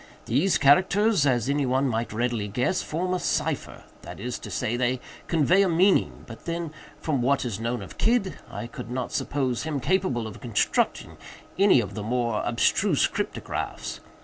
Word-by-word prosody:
These 145 +11 +2
characters, 185 +4 +4
as 125 -2 +1
any 140 -1 +1
one 130 +2 +2
might 115 -1 -1
readily 115 -1 -1
guess, 125 - 0
form 180 +4 -2
a 185 - 0
cipher—that - - -4
is 125 0 -4
to - - -8
say, 115 - -1
they 125 +1 0 0.3
convey 170 +4 +4
a 195 - +3
meaning; 185 +4 +2
but - - -11
then, 170 -2 -3 0.3
from 145 -5 -1
what 135 +2 +2
is 110 -4 -3
known 115 -1 -2
of 95 - -12
Kidd, 225 -4 +2
I - - -6
could 125 -1 -8
not 125 0 -3
suppose 130 -4 -1
him 155 -3 -2
capable 150 -7 0
of 110 - -8
constructing 115 -5 0 0.4
any 195 -8 +6
of 100 -3 -6
the 105 - -5
more 115 0 0
abstruse 120 - +2
cryptographs. - - -4
130 Hz, 170 wpm, -26 LUFS, 120-170 Hz, 0.4 s, any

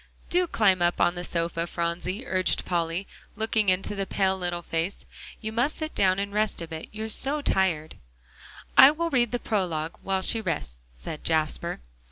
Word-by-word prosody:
"Do 360 0 +3
climb 195 - +3
up 175 0 +2
on 175 - +4
the 175 0 -5
sofa, 170 -1 -1
Phronsie," 175 +7 -3
urged 185 -4 +1
Polly, 170 +1 -1 0.3
looking 220 -1 +1
into 185 +2 +1
the 195 -1 -3
pale 190 -1 +1
little 175 -2 -3
face, 165 +4 -3 0.4
"you 220 -1 -4
must 245 +7 0
sit 310 -1 -4
down 185 -1 +3
and 200 0 -3
rest 215 0 0
a 165 - -5
bit, 160 -1 -7
you're 220 +1 -5
so 280 +6 -1
tired." 170 - 0 0.8
"I 265 - +10
will 335 +3 -1
read 240 -4 +2
the 245 - 0
prologue 175 -8 -2
while 190 -1 -1
she 225 - +3
rests," - - -4
said 150 - -7
Jasper. 160 - 0
190 Hz, 180 wpm, -26 LUFS, 170-220 Hz, 0.8 s, I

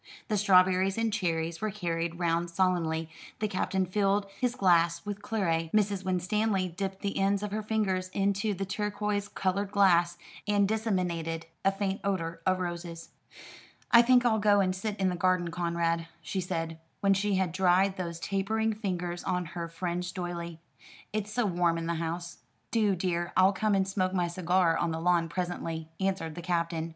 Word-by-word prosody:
The 210 - +1
strawberries 190 0 +4
and 225 -1 0
cherries 165 -4 -1
were 215 - 0
carried 170 -4 -3
round 170 0 0
solemnly, 170 -3 0 0.3
the 215 - -1
Captain 190 -1 0
filled 200 +2 +1
his 250 -1 0
glass 170 -4 +3
with 205 0 -5
claret, 165 -7 -1
Mrs. 205 -2 +2
Winstanley 190 +2 0
dipped 190 +2 -4
the 200 -1 -2
ends 200 +1 +2
of 210 - -3
her 215 +1 -2
fingers 205 -4 -1
into 200 +2 0
the 195 +2 -3
turquois 205 +1 -2
coloured 195 +1 -1
glass, 175 -4 +4 0.3
and 205 -1 +3
disseminated 180 -7 -1 0.2
a 195 - +4
faint 195 0 -2
odour 170 -4 -2
of 185 0 +3
roses. 170 -2 -5 0.8
"I 235 - +9
think 245 0 +4
I'll 220 -2 +3
go 205 -1 +4
and 185 -1 +1
sit 205 +2 -3
in 190 -1 +2
the 180 - -2
garden, 180 -1 +1
Conrad," 170 -1 -1 0.2
she 190 +5 -2
said, 165 -2 -3 0.2
when 195 -1 +4
she 200 +1 +1
had 185 -2 +1
dried 190 +2 +3
those 170 -2 -4
tapering 220 +4 0
fingers 180 -4 -3
on 180 -1 -1
her 170 -1 -4
fringed 180 +2 -4
doiley. 170 -2 -4 0.6
"It's 210 -1 -2
so 245 +1 +1
warm 175 -3 +1
in 165 - -3
the 170 - -1
house." 170 +1 -4 0.3
"Do, 210 -4 +2
dear. 175 -1 -2
I'll 190 +2 +6
come 210 +1 +1
and 190 -1 +1
smoke 190 -1 -1
my 175 -1 +1
cigar 175 -1 +2
on 170 - 0
the 160 0 -2
lawn 170 -1 +2
presently," 165 -2 -4
answered 190 -4 -1
the 175 - -7
Captain. 170 -1 -1
185 Hz, 175 wpm, -29 LUFS, 170-200 Hz, 0.8 s, I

